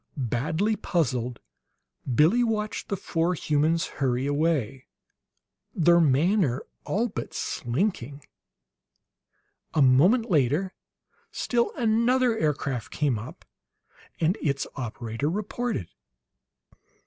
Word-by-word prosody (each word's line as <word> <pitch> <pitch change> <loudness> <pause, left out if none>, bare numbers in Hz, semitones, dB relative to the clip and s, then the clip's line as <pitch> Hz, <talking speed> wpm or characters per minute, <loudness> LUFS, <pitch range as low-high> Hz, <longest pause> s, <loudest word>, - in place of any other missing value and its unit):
Badly 150 - 0
puzzled, 125 - -1 0.7
Billie 165 - +4
watched 215 -2 -2
the 200 - -1
four 170 +1 -1
humans 155 +2 +1 0.2
hurry 130 -1 +1
away, 145 -4 -1 0.9
their 170 +1 +5
manner 150 - +2 0.2
all 230 +4 0
but - - -6
slinking. 140 - -2 1.5
A 150 - +3
moment 180 - +4
later 155 +5 +2 0.6
still 235 -1 0
another 235 +2 +2
aircraft 140 - -2
came 140 -7 0
up, 110 - -10 0.7
and 170 +5 +1
its 140 -2 0
operator 120 +1 -3
reported. 210 - -3
155 Hz, 90 wpm, -26 LUFS, 130-205 Hz, 1.5 s, their